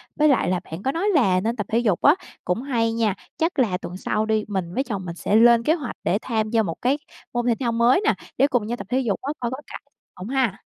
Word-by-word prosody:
Với 305 0 +3
lại 275 -10 +3
là 180 -1 +1
bạn 165 +5 -8
có 265 - +1
nói 350 +8 0
là 195 - +4
nên 225 +5 -1
tập 210 -4 -3
thể 225 - +2
dục 210 -7 +1
á 290 - +6 0.3
cũng 180 +7 0
hay 235 -5 0
nha. 225 -4 +1 0.2
Chắc 325 -1 0
là 210 -8 +2
tuần 180 -1 -7
sau 215 +2 -1
đi, 220 -1 +1
mình 185 -4 -3
với 265 - 0
chồng 205 -8 -5
mình 170 -1 -6
sẽ 205 - 0
lên 235 +1 +6
kế 310 - +3
hoạch 290 -8 -4
để 195 - +2
tham 220 -3 -1
gia 225 -1 +2
một 165 -5 -5
cái 265 +4 +2 0.4
môn 240 0 -1
thể 235 - +3
thao 245 -3 0
mới 235 - +3
nè - - +4 0.2
để 275 - +5
cùng 245 -6 0
nhau 240 +2 -3
tập 195 - -8
thể 255 +2 +1
dục 225 -7 -1
á, 280 +3 -3
coi 240 -1 -2
có 260 - -4
cải - - -8 0.3
hông 185 - -8
ha. 255 -7 0
230 Hz, 280 wpm, -23 LUFS, 200-260 Hz, 0.4 s, á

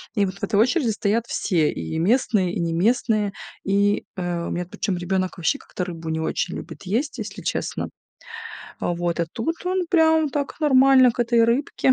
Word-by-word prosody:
И 205 -2 +3
вот 190 -1 -4
в - - -18
этой 200 - -1
очереди 250 +2 +3
стоят 220 +2 0
все: 165 -10 +1
и 80 - -4
местные, 200 -2 +2
и - - -2
неместные. 205 +5 +1 0.3
И, 200 +1 +2
э, 175 -2 -2
у - - -4
меня 175 0 -2
причём 185 +1 -3
ребёнок 185 +1 -1
вообще 175 +11 0
как-то 180 - -5
рыбу 165 -2 -6
не 160 0 -1
очень 160 +2 -2
любит - - -8
есть, 230 +10 -2
если - - -6
честно. - - -3 0.9
А - - 0
вот, 175 0 -1
а 170 - 0
тут 315 +9 -2
он 365 0 0
прям 320 -3 +4
так 285 0 -3
нормально 265 -3 +6
к 240 - -4
этой 235 -1 +4
рыбке. 260 +2 +2
205 Hz, 185 wpm, -23 LUFS, 175-255 Hz, 0.9 s, нормально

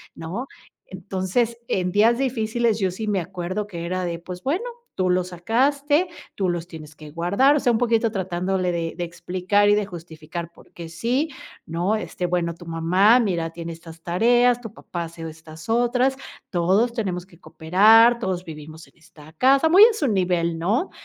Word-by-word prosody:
¿no?, 185 +11 -5 0.4
entonces, 190 +5 -2
en 180 -1 -1
días 225 +5 +3
difíciles 235 -3 0
yo 190 -2 0
sí 215 +4 -6
me 200 -2 +1
acuerdo 185 +3 -4
que 170 -4 -7
era 185 0 -2
de: 170 -1 -4
"Pues 180 +1 -9
bueno, 320 - -1 0.3
tú 185 -1 0
los 180 0 +1
sacaste, 280 - +1 0.3
tú 195 - -1
los 175 0 -3
tienes 155 -3 -11
que 155 0 -12
guardar", 200 - +2
o 295 - +2
sea, 245 - +2
un 225 - +1
poquito 230 -2 +2
tratándole 185 -1 -1
de 165 -1 -3
de 175 - -4
explicar 185 +4 0
y 205 - +6
de 210 -1 -1
justificar 170 -1 -8
por - - -20
qué 170 -1 -8
sí, 245 - -1 0.4
¿no?, 175 +6 -1
este, 180 -4 -4
bueno, 175 -1 -1
"Tu 175 - -13
mamá, 180 +8 +4
mira, 175 -8 -1
tiene 165 0 -7
estas 165 0 -13
tareas, 240 +7 +3
tu 225 -4 -8
papá 175 -6 -6
hace 165 0 -8
estas 160 +1 -13
otras, 245 +3 +2 0.4
todos 195 +7 +2
tenemos 185 -6 -3
que 175 -3 -21
cooperar, 220 +9 +5
todos 185 -4 -3
vivimos 155 0 -10
en - - -26
esta 155 -1 -17
casa", 270 - +4
muy 370 +5 +8
a 460 - +4
su 305 -10 -1
nivel, 175 -5 0
¿no?, 220 - 0
185 Hz, 180 wpm, -23 LUFS, 170-230 Hz, 0.4 s, muy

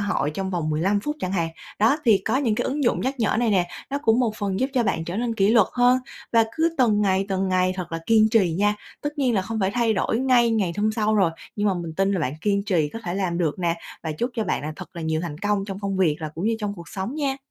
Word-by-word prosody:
hội 205 -7 0
trong 190 +5 -4
vòng 165 -4 -1
15 190 +7 +1
phút 295 +7 -3
chẳng 185 - -2
hạn. 170 -3 0 0.3
Đó, 225 +8 +4
thì 220 -5 +5
có 225 +4 +1
những 245 -6 +1
cái - - -1
ứng 285 +1 -1
dụng - - +2
nhắc 265 +2 -1
nhở 220 - +2
này 235 -1 +2
nè, 180 -3 +2 0.2
nó 280 - -1
cũng 225 +2 +3
một 220 -3 0
phần 200 0 -2
giúp 265 +2 0
cho 245 - +3
bạn 165 -6 -1
trở 170 +3 -4
nên 235 0 -1
kỷ 195 -1 +3
luật 225 -4 +5
hơn 250 +1 +4 0.3
và 230 -1 +5
cứ 330 +1 +1
từng 220 -5 +3
ngày 195 -1 +2
từng 190 -1 0
ngày 185 0 +2
thật 175 -3 -5
là 165 - -1
kiên 220 -1 +5
trì 200 -7 +3
nha. 205 +1 +3 0.3
Tất 290 0 -5
nhiên 255 -4 +2
là 190 - +2
không 220 +2 -4
phải 190 0 +1
thay 235 0 +1
đổi 220 +3 0
ngay 250 -3 +4
ngày 200 -6 +1
hôm 215 +1 +1
sau 215 -1 +1
rồi 190 -5 +3 0.3
nhưng 205 - 0
mà 190 - +1
mình 170 -2 -5
tin 195 +2 +1
là 185 - 0
bạn 130 -2 -1
kiên 200 +1 +1
trì 175 -7 +1
có 225 - -5
thể 175 - -3
làm 185 -3 -1
được 165 -1 0
nè, 170 -2 +1 0.3
và 160 -2 -3
chúc 240 +12 -2
cho 220 -2 -1
bạn - - -1
là 155 +1 -4
thật - - -11
là 170 - -4
nhiều 160 0 0
thành 160 -4 -5
công 205 +1 0
trong 195 -1 -6
công 195 -1 -2
việc 165 -6 +2
là 155 - -3
cũng 170 +5 -4
như 225 0 +1
trong 205 -1 -3
cuộc 170 -2 -11
sống 195 +7 -4
nha. 280 -3 -1
205 Hz, 295 wpm, -24 LUFS, 180-230 Hz, 0.3 s, thì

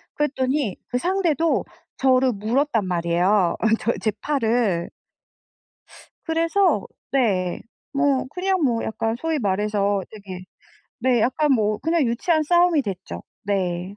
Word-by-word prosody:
그랬더니 265 -5 0
그 245 - -1
상대도 335 0 +1 0.3
저를 260 -1 +3
물었단 225 +2 0
말이에요, 175 +2 +2
어 225 - +1
저의 230 - -1
제 220 - +1
팔을. 230 - 0 1.4
그래서 330 +4 +2 0.3
네 195 -9 +1 0.3
뭐 275 -1 +1
그냥 370 +3 -1
뭐 235 -4 +1
약간 225 0 -2
소위 325 0 -1
말해서 200 -1 0
되게 195 -4 -9 0.6
네 245 -1 +2
약간 285 +5 +2
뭐 215 -4 +1
그냥 325 -1 +1
유치한 310 +7 +1
싸움이 345 0 +4
됐죠. 185 - -6 0.2
네. 185 -1 -2
235 Hz, 235 characters per minute, -23 LUFS, 200-295 Hz, 1.4 s, 싸움이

